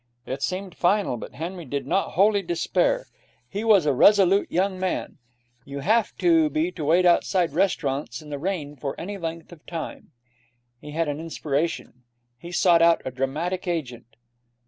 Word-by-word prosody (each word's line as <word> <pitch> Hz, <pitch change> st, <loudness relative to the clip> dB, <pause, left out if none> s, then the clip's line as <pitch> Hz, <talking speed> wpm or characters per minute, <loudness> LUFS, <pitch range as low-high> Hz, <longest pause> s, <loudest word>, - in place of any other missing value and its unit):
It 135 Hz, +1 st, -5 dB
seemed 185 Hz, +2 st, -3 dB
final, 190 Hz, -5 st, +1 dB
but 120 Hz, -, -9 dB
Henry 170 Hz, +5 st, -5 dB
did 140 Hz, -1 st, -4 dB
not 195 Hz, -, 0 dB
wholly 200 Hz, +2 st, +4 dB
despair. 175 Hz, -, 0 dB, 0.4 s
He 205 Hz, +3 st, -4 dB
was 210 Hz, -7 st, +5 dB
a 145 Hz, -, +3 dB
resolute 195 Hz, +6 st, +4 dB
young 185 Hz, +1 st, 0 dB
man. 185 Hz, -4 st, -3 dB, 0.4 s
You 140 Hz, +2 st, -7 dB
have 220 Hz, +6 st, +1 dB
to 330 Hz, -3 st, +4 dB
be 320 Hz, +3 st, 0 dB
to 155 Hz, -, -6 dB
wait 175 Hz, +4 st, +4 dB
outside 175 Hz, -1 st, +3 dB
restaurants 155 Hz, -6 st, -1 dB
in 150 Hz, -2 st, -12 dB
the 145 Hz, -, -4 dB
rain 155 Hz, -4 st, -3 dB
for 140 Hz, 0 st, -5 dB
any 200 Hz, +3 st, -5 dB
length 165 Hz, -1 st, -6 dB
of 170 Hz, -3 st, -14 dB
time. 165 Hz, -2 st, -6 dB, 0.7 s
He 150 Hz, -, -11 dB
had 160 Hz, +2 st, -1 dB
an 145 Hz, 0 st, -3 dB
inspiration. 155 Hz, -4 st, -3 dB, 0.4 s
He 170 Hz, -, -9 dB
sought 175 Hz, -1 st, +4 dB
out 170 Hz, 0 st, +4 dB
a 130 Hz, -, -3 dB
dramatic 150 Hz, +9 st, -3 dB
agent. 125 Hz, -9 st, -4 dB
170 Hz, 170 wpm, -24 LUFS, 150-195 Hz, 0.7 s, was